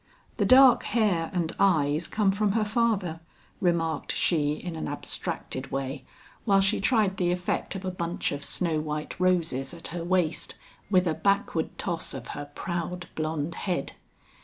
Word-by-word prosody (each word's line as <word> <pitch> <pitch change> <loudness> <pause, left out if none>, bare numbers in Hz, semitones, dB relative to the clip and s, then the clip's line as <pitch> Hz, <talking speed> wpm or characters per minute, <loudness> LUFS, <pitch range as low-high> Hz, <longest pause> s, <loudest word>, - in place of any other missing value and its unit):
"The - - +2
dark 260 -1 +8
hair 205 -8 +1
and 170 -2 -2
eyes 160 -4 +3
come 210 -3 +2
from 200 0 +1
her 220 -1 +2
father," 210 -7 0 0.4
remarked 165 -5 0
she 150 -4 +1
in 170 +2 -6
an 160 - -4
abstracted - - -4
way 135 0 -3 0.4
while 200 -3 +4
she 195 +2 +2
tried 205 -3 +2
the 175 -1 +1
effect 180 +2 -2
of 190 0 -5
a 185 - -1
bunch 170 -1 -2
of 145 0 -4
snow 165 0 0
white 150 0 -4
roses 170 -6 +1
at 165 - -8
her 170 0 -4
waist 175 -2 0 0.3
with 185 -2 +4
a 165 - +1
backward 200 -4 0
toss 170 -6 -3
of 125 -3 -8
her 145 0 -6
proud 175 0 -4
blonde 155 0 -2
head. 175 -6 -2
175 Hz, 160 wpm, -27 LUFS, 160-195 Hz, 0.4 s, dark